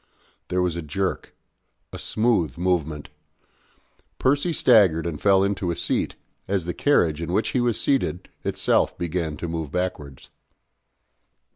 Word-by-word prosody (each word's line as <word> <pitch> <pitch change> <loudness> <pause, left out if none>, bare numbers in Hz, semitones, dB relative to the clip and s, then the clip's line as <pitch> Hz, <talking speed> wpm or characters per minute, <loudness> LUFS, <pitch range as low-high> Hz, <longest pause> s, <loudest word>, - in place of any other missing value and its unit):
There 90 0 0
was 90 -2 -1
a 85 - -3
jerk 90 +5 -3 0.6
a - - -6
smooth 110 - 0
movement. 80 -4 -1 1.1
Percy 145 +6 +2
staggered 100 - +4
and 80 -4 -4
fell 95 -1 +4
into 100 -2 -1
a 85 - -1
seat, 85 0 -1 0.3
as 95 -3 -1
the 90 - -3
carriage 85 - +2
in 85 - -3
which 105 - +1
he 125 - 0
was 120 -2 0
seated 125 -10 0 0.2
itself - - +1
began 85 -3 -3
to 85 - -4
move 80 -3 -4
backwards. 85 -7 -4
90 Hz, 140 wpm, -24 LUFS, 80-100 Hz, 1.1 s, staggered